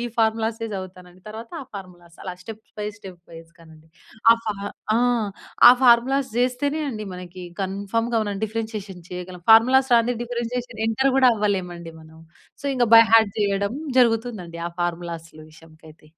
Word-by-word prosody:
ఈ - - -3
ఫార్ములా‌సే 225 0 0
జదువుతానండి, 185 -1 -10
తర్వాత 225 +2 -9
ఆ - - -11
ఫార్ములాస్. 175 -4 -11
అలా 185 -2 -5
స్టెప్ 220 +2 -10 0.2
బై 210 - -3
స్టెప్ 185 -4 -12
వైస్‌గా‌నండి. 165 -1 -16 0.4
ఆ - - +3
ఫా 215 -2 -2 0.4
ఆ! - - +3 0.7
ఆ - - +11
ఫార్ములాస్ 255 +2 +4
జేస్తేనే 255 +5 0
అండి 215 -3 -6
మనకీ 180 0 -9 0.2
కన్ఫర్మ్‌గా 205 +5 -2
మనం 200 -1 -4
డిఫరెన్షియేషన్ 215 -4 -6
చెయగలం. 180 0 -8
ఫార్ములాస్ 255 +3 +5
రాందే 235 +1 +3
డిఫరెన్షియేషన్ 240 -1 -4
ఎంటర్ 265 +4 +1
గూడా 260 -2 +6
అవ్వలేమండి 180 -5 -3
మనం. 160 0 -16 0.4
సో, - - -4
ఇంక 245 -2 +2
బై 230 - +10
హార్ట్ 220 -3 +5
జెయ్యడం 200 +1 0 0.2
జరుగుతుందండి 225 -8 0
ఆ - - -13
ఫార్ములాస్లు 170 -2 -5
విషయంకయితే. 155 -1 -18
205 Hz, 145 wpm, -22 LUFS, 180-235 Hz, 0.7 s, ఆ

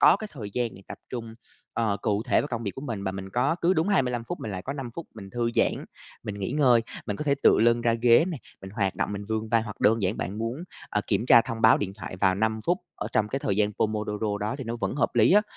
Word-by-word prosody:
có - - +7
cái 215 +1 -7
thời 110 -8 -7
gian 120 -1 -1
này 95 - -13
tập - - -8
trung, 115 -2 -6 0.4
ờ, 110 -3 0
cụ 105 -1 +1
thể - - +2
vào 145 - -4
công 120 -2 -3
việc 100 - -2
của - - -7
mình, 115 -8 -4
và 95 - -1
mình 95 0 -7
có 130 - +1
cứ 180 +3 +4
đúng 160 +4 +1
25 125 - +1
phút - - -5
mình 110 - -4
lại 95 -2 -5
có 135 - -4
5 135 -4 -6
phút 170 - -6
mình 100 -3 -10
thư 120 0 -1
giãn, - - +1 0.4
mình 105 -1 -5
nghỉ 95 - -2
ngơi. 130 -5 +5 0.3
Mình 105 - -2
có 150 - -4
thể 140 -1 +3
tựa - - +6
lưng 120 +1 +4
ra 115 -1 +2
ghế 115 +5 +5
nè, 165 -6 -4 0.2
mình 95 - -8
hoạt 100 -2 -1
động, - - -1
mình 100 0 -5
vươn 110 0 -2
vai, 115 -1 +3
hoặc 105 -2 -8
đơn 110 +1 +3
giản 95 +3 0
bạn 95 +6 -4
muốn, 115 +9 -3 0.3
ờ, 105 - +1
kiểm 115 - 0
tra 120 -2 +8
thông 115 -2 -5
báo 110 - +7
điện 95 -2 -3
thoại 100 -3 -7
vào 95 0 +3
5 110 +2 0
phút 175 +2 +2 0.2
ở 105 - -4
trong 105 -1 +2
cái 135 - -2
thời 100 -7 -1
gian 105 0 +2
Pomodoro 105 0 -1
đó 105 +5 -1
thì 135 - -5
nó 115 +1 -3
vẫn 115 - -2
hợp 145 - 0
lý 115 +4 +5
á. 210 +2 +6
115 Hz, 290 wpm, -26 LUFS, 105-125 Hz, 0.4 s, tra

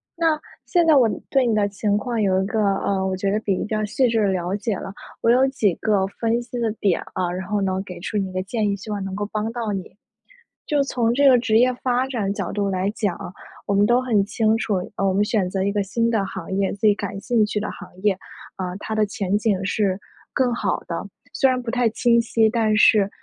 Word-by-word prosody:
那 325 -3 +1 0.3
现 345 -2 +3
在 315 - +6
我， 250 -5 +5
嗯， - - -4
对 265 -3 +3
你 225 - +2
的 205 -1 +2
情 205 +1 0
况 235 +1 -2
有 190 -2 +2
一 - - -2
个， 220 +3 -2
呃， 195 -1 +1
我 190 -1 -1
觉 195 +1 0
得 210 - +1
比 200 -4 -1
较 215 0 -1
细 255 +5 +1
致 230 -1 +1
的 205 - +3
了 185 0 -1
解 205 +1 -2
了。 195 - -7 0.3
我 230 - +4
有 260 +2 +4
几 215 -9 +1
个 205 -3 +1
分 230 +3 -1
析 245 0 -6
的 230 -2 0
点 195 -4 +1
啊， 180 -2 -1
然 185 +1 -5
后 210 0 0
呢 190 -1 0
给 180 -3 -9
出 210 +3 -3
你 195 -2 -1
一 - - -11
个 185 0 -2
建 210 +1 -1
议， 200 - 0
希 205 +2 -8
望 205 -2 -3
能 190 0 -5
够 205 +1 -3
帮 215 +1 -2
到 230 -3 -3
你。 195 +1 -6 0.7
就 290 -2 +2
从 240 -4 0
这 280 +3 +4
个 255 -2 +7
职 220 -2 +2
业 250 +2 +4
发 250 0 +1
展 215 -7 -2
角 - - -4
度 200 -1 -1
来 190 +1 0
讲， 205 -5 -2 0.5
我 200 - -1
们 200 +1 +4
都 240 +3 +3
很 225 -6 +2
清 220 +1 +1
楚， 215 -2 -1 0.2
呃， 195 - +1
我 190 - +2
们 200 +2 +3
选 205 -4 0
择 190 0 -1
一 200 - +1
个 205 0 0
新 230 +4 0
的 220 -4 +1
行 190 -3 -7
业， 195 -1 +1
自 200 - -11
己 210 - +6
感 200 -1 -5
兴 230 -2 +2
趣 210 - -4
的 210 - -1
行 - - -10
业， 205 -2 +4 0.4
呃， 180 -1 -4
它 220 - -5
的 215 -1 +2
前 200 -1 -1
景 205 -4 0
是 195 -1 0 0.4
更 250 -2 +1
好 240 - -1
的。 - - -3 0.3
虽 270 - +3
然 255 -1 0
不 235 - -4
太 245 -1 +2
清 235 +1 +3
晰， 225 -1 +2
但 220 -2 +1
是 210 -1 +5
210 Hz, 270 characters per minute, -22 LUFS, 195-235 Hz, 0.7 s, 个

